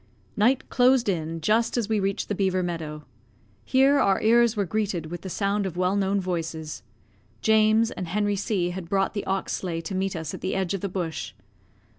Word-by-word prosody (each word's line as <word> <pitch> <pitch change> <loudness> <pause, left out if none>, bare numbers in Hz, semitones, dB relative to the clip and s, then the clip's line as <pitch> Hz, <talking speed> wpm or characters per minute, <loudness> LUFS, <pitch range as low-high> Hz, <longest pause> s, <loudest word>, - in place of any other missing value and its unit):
Night 250 +5 +2
closed 250 -1 +4
in 165 -3 -2
just 225 +6 +2
as 230 -4 0
we 220 -1 +1
reached 195 0 -1
the - - -1
beaver 185 -2 +1
meadow. 155 -3 -5 0.6
Here 275 +2 +4
our 195 -6 +3
ears 235 0 +4
were 200 - +1
greeted 200 -4 -2
with 175 -1 -5
the 190 - -6
sound 200 +1 0
of 175 -2 -7
well 185 +2 +1
known 200 0 +1
voices. 165 -4 -4 0.6
James 220 0 +4
and 185 - -5
Henry 205 +3 0
C 190 -3 -1
had 175 -2 -7
brought 195 0 +1
the 205 - -3
ox 195 0 -1
sleigh 170 -3 -3
to 165 +4 -6
meet 190 0 -1
us 160 -2 -4
at - - -7
the 190 - -2
edge 190 -1 -1
of 195 - -3
the 200 - -2
bush. 175 -3 -4
195 Hz, 200 wpm, -25 LUFS, 175-215 Hz, 0.6 s, closed